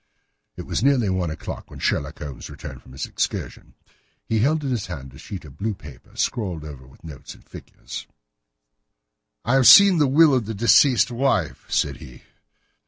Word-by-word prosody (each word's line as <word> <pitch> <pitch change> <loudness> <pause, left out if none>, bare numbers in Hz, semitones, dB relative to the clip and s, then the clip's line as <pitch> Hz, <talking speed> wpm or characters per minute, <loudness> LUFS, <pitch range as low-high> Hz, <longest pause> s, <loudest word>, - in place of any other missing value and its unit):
It - - -6
was 105 - -3
nearly 130 -8 +2
one 90 -3 -1
o'clock 80 - -7
when - - -11
Sherlock - - -2
Holmes 70 -3 -8
returned - - -10
from 65 - -17
his 65 - -4
excursion. - - -4 0.5
He 110 - 0
held 150 +6 +1
in 135 - -2
his 115 -6 -2
hand 70 -7 -8
a 65 - -14
sheet 95 -5 -8
of 70 -1 -15
blue 110 0 -2
paper, 70 -8 -15
scrawled 90 -9 -2
over 70 -4 -11
with 65 - -21
notes 75 -4 -10
and - - -22
figures. - - -10 1.4
"I 120 - +1
have 135 -2 +5
seen 200 -4 +8
the 145 - +4
will 150 +2 +5
of 125 -5 0
the 110 - -4
deceased 125 +3 +4
wife," 120 - -1
said - - 0
he. 65 - -14
105 Hz, 180 wpm, -22 LUFS, -, 1.4 s, seen